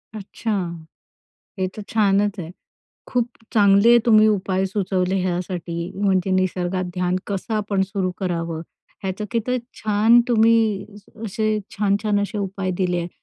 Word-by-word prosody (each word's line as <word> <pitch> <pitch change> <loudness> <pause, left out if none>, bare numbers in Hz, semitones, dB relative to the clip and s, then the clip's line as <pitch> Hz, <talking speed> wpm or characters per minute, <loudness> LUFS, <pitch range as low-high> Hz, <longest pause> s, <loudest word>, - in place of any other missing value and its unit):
अच्छा. 215 +2 -5 1.1
हे 185 - +1
तर 215 - -6
छानच 205 -2 +2
आहे. 165 -1 -6 0.6
खूप 245 -1 0 0.2
चांगले 205 +3 +6
तुम्ही 215 -2 +6
उपाय 190 -2 0
सुचवले 190 -2 -1
ह्यासाठी 175 -1 -3
म्हणजे 190 -2 +2
निसर्गात 185 0 0
ध्यान 180 0 0
कसं 200 +2 -3
आपण 200 -2 0
सुरू 190 -1 -2
करावं? 170 -3 -2 0.4
ह्याचं 190 +2 -3
किती 245 +2 0 0.2
छान 215 +3 +5
तुम्ही 225 -3 +3 0.3
अ, 225 - -11
असे 215 0 0 0.2
छान-छान 205 0 +1
असे 205 +1 -3
उपाय 195 -1 -3
दिले 180 -2 0
आहे 170 0 -3
195 Hz, 130 wpm, -22 LUFS, 185-215 Hz, 1.1 s, चांगले